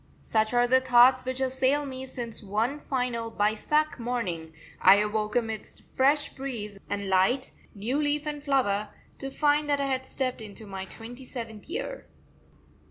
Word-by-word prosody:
Such 220 -1 +1
are 245 0 +5
the 260 +1 +4
thoughts 255 0 +6
which 260 0 -1
assail 265 +2 +2
me 260 -1 -5
since 240 -3 -3
one 220 +8 -1
fine 250 -4 -1
Bysakh 230 +7 0
morning 200 -10 -3 0.3
I 190 +1 +9
awoke 210 +1 0
amidst 225 -3 -3
fresh 285 +3 +3
breeze 220 -7 -5
and 200 -1 -2
light, 195 +8 +2 0.2
new 240 +9 -1
leaf 295 0 0
and 295 -1 -4
flower, 215 -8 +1 0.3
to 270 - -4
find 295 +1 +2
that 285 -1 +2
I 280 - +1
had 260 -1 -1
stepped 255 -3 -2
into 215 +1 -7
my 190 -1 -6
twenty 240 +6 -8
seventh 230 -3 -7
year. - - -5
245 Hz, 160 wpm, -27 LUFS, 215-270 Hz, 0.3 s, I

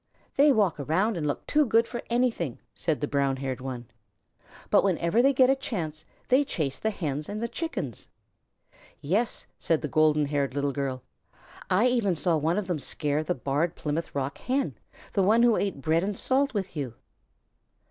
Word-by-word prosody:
"They 285 +1 +6
walk 205 - +2
around 185 - +1
and 155 -3 -2
look 145 - -3
too 300 +1 +3
good 230 -3 +3
for 240 - -5
anything," 235 - 0 0.2
said 160 -3 -1
the 145 - 0
brown 140 -2 +1
haired 130 -1 -4
one, 130 -2 -5 0.9
"but - - +5
whenever 180 +2 +2
they 275 +2 +5
get 260 -1 +5
a - - +3
chance 165 - -5 0.2
they 260 +3 +4
chase 150 - -3
the 220 - 0
Hens 150 -7 -3
and 210 +1 -4
the 235 - -1
Chickens." 330 +7 -5 0.9
"Yes," 205 +10 0
said 165 -2 +1
the - - 0
golden 155 0 +3
haired 140 -2 -1
Little 140 0 0
Girl, 135 -2 -3 0.7
"I 190 +6 +4
even 235 -7 +2
saw 170 +1 +1
one 160 +4 +1
of 210 - -1
them 175 -4 -2
scare 145 +3 -1
the - - -1
Barred 145 +6 -1
Plymouth 155 +1 -3
Rock 140 0 -2
Hen, 265 +2 -1 0.4
the 200 - +2
one 220 +5 +4
who 235 -2 +5
ate 195 -8 -2
bread 160 +4 +2
and 200 0 -2
salt 275 +2 +1
with 195 -3 -3
you." 135 -6 -4
170 Hz, 185 wpm, -27 LUFS, 145-225 Hz, 0.9 s, They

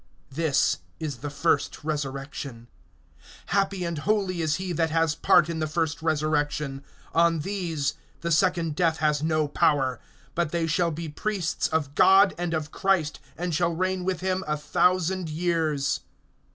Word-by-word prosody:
This 150 0 +1 0.2
is 150 -5 -4
the 145 +5 -5
first 145 0 0
resurrection. 140 -4 -4 0.9
(6)Happy 195 -2 +1
and 170 -3 -3
holy 190 -1 0
is 155 -1 +1
he 185 -1 -3
that 165 0 +1
has 165 -1 +2
part 155 - +4
in 165 -1 -3
the 155 - 0
first 160 0 -1
resurrection; 150 -3 -1 0.3
on 165 -1 +3
these 165 -6 -2 0.3
the 170 - -2
second 170 -2 +2
death 165 -2 +2
has 150 -2 +1
no 155 -1 +1
power, 135 -4 +2 0.3
but 170 -2 0
they 170 0 0
shall 170 +2 +1
be 165 +1 -5
priests 180 +2 -1
of 150 -3 -1
God 190 +4 +6
and 175 -1 -1
of 155 -1 -3
Christ, 190 -6 +1 0.2
and 175 0 -2
shall 170 +1 +1
reign 185 +1 -1
with 185 -1 -2
him 185 0 0
a 150 0 0
thousand 180 +3 +1
years. 155 -3 0
160 Hz, 155 wpm, -26 LUFS, 150-175 Hz, 0.9 s, God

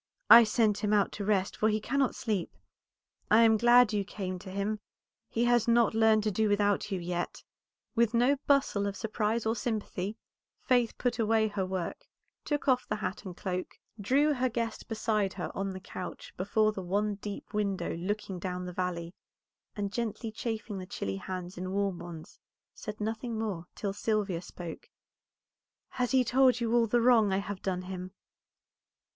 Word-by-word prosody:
I 235 0 +11
sent 215 -1 +2
him 210 0 0
out 205 -1 +3
to 205 - -5
rest, 200 -2 +1
for 215 - +2
he 215 0 +1
cannot 270 +4 0
sleep. 205 -6 -2 0.7
I 220 +2 +6
am 225 -1 +6
glad 240 0 +6
you 205 -1 +1
came 185 -2 -5
to 185 - -10
him; 200 +3 -2 0.5
he 230 - 0
has 240 -1 +3
not 235 -2 +4
learned 220 -1 +4
to 215 - +1
do 215 +2 +1
without 205 0 +2
you 190 - -1
yet." 175 0 -4 0.5
With 235 0 +2
no 250 +4 +4
bustle 270 -8 +3
of 200 - -3
surprise 220 +2 -1
or 225 +1 +1
sympathy 215 -3 -3 0.4
Faith 245 -3 +1
put 245 -1 -1
away 220 0 +3
her 195 -2 -2
work, 185 -2 -4 0.4
took 295 -1 -2
off 255 -2 +3
the 210 - -1
hat 210 -1 -4
and 180 -2 -7
cloak, 185 -1 -4 0.2
drew 280 +9 +3
her 255 -1 0
guest 230 -1 -3
beside 215 -3 0
her 180 - -4
on 195 0 -2
the 190 -1 -6
couch 185 -1 -8
before 215 +3 +2
the 200 - -6
one 205 +4 0
deep 205 0 -7
window 200 -4 -1
looking 190 +1 -3
down 180 0 -4
the 180 - -6
valley, 175 -1 -3 0.6
and 200 -2 -3
gently 230 -1 -3
chafing 220 -2 -4
the 185 - -7
chilly 95 - -4
hands 180 - -6
in 185 +1 -4
warm 195 -2 0
ones, 170 +1 -10 0.3
said 210 -1 -7
nothing 225 +2 -3
more 200 -6 -3
till 200 -3 -3
Sylvia 205 -4 -1
spoke. 175 -2 -9 1.1
"He 250 +1 +2
has - - -1
told 255 0 +4
you 230 -1 0
all 235 -1 +4
the 240 +2 +2
wrong 230 -4 +5
I 190 - +2
have 200 -1 -4
done 185 -1 -2
him?" 185 0 -6
210 Hz, 180 wpm, -30 LUFS, 190-230 Hz, 1.1 s, I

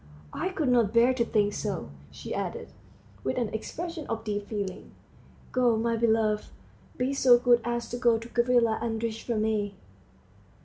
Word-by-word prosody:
I - - -2
could 320 -8 -1
not 235 -4 +3
bear 240 +2 +5
to 250 -2 +1
think 205 -3 +1
so," 190 - -4 0.2
she - - -7
added, - - -4 0.5
with 130 - -1
an 235 -4 0
expression 330 +8 -5
of 225 -1 -3
deep 205 -2 -3
feeling. 200 -4 -5 0.6
"Go, 245 -3 +3
my 230 +1 0
love; 220 -2 +1 0.5
be 255 +2 0
so 255 -3 +6
good 240 -1 +4
as 240 0 -2
to 245 - -4
go 235 -2 +3
to 225 +1 -8
Gavrila 240 -2 +2
Andreitch 225 -1 -2
for 235 - -2
me." 215 -2 0
230 Hz, 165 wpm, -28 LUFS, 215-245 Hz, 0.6 s, so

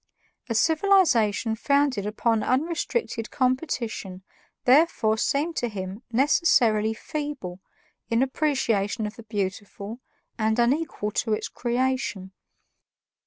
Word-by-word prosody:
A 230 - -1
civilization 290 - +3
founded 280 -4 +1
upon 225 +1 +1
unrestricted 305 - -1
competition 250 - -2 0.4
therefore 255 -5 +4
seemed 290 +8 0
to 240 - 0
him 195 0 -6
necessarily 230 -5 +3
feeble 285 -12 -5 0.5
in 230 +2 +3
appreciation 240 -7 0
of 210 - -5
the - - -10
beautiful, 205 +1 -5 0.4
and 220 0 +1
unequal 240 -3 0
to 220 +1 0
its 215 - -2
creation. 245 -6 -2
235 Hz, 100 wpm, -25 LUFS, 210-280 Hz, 0.5 s, therefore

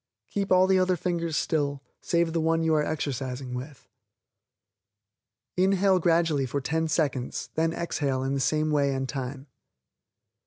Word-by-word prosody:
Keep 200 -1 -2
all 185 0 +6
the 190 0 +3
other 185 0 +2
fingers 170 -3 -2
still, 145 -3 -1 0.2
save 170 -1 +1
the 165 - +1
one 165 +1 +1
you 160 0 +2
are 150 -1 +3
exercising 135 -4 -3
with. 130 +3 -8 1.7
Inhale 190 0 +3
gradually 165 -5 +2
for 140 +3 -2
ten 160 +4 -1
seconds, 145 -6 -1
then 165 +1 +1
exhale 140 -6 -2
in 135 +1 -1
the 140 - 0
same 155 +3 +1
way 140 -2 +2
and 135 0 -2
time. 135 0 -5
155 Hz, 150 wpm, -27 LUFS, 135-170 Hz, 1.7 s, all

